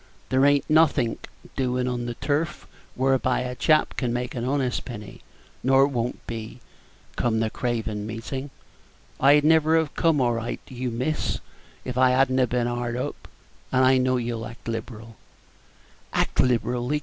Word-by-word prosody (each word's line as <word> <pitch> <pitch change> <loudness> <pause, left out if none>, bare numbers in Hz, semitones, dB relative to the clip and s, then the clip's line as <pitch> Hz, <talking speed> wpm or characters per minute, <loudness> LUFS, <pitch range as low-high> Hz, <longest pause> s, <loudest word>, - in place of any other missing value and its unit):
There 130 +1 +3
ain't 145 0 +3
nothink 155 -7 +2 0.3
doin' 125 -1 0
on 120 -1 -2
the 120 - -4
turf 150 +6 -2 0.3
whereby 130 0 +1
a 125 0 -3
chap 155 +4 +2
can 125 -3 0
make 125 +1 -3
an 120 - -4
honest 130 -1 0
penny, 105 -4 -9 0.4
nor 135 +1 +5
won't 125 -3 -3
be, 115 +1 -6 0.6
come 110 -2 +1
the 110 -1 0
Craven 110 -4 -2
Meetin'. 130 +5 -5 0.7
I'd 145 +2 +6
never 160 +1 +4
have 160 -2 0
come 165 -4 +2
anigh 120 -2 0
you, 125 0 -3
miss, 130 +7 -1 0.5
if 125 0 -3
I 130 0 +6
had 130 +1 +3
n't 130 -2 +2
been 120 0 0
hard 120 0 -2
up, 125 - -5 0.4
and 130 0 +4
I 130 0 +5
know 130 0 +2
you'll 115 -2 -3
act 115 +1 -13
liberal." 115 -1 -6 1.0
"Act - - 0
liberally!" 125 +3 +1
125 Hz, 155 wpm, -25 LUFS, 120-135 Hz, 1.0 s, I'd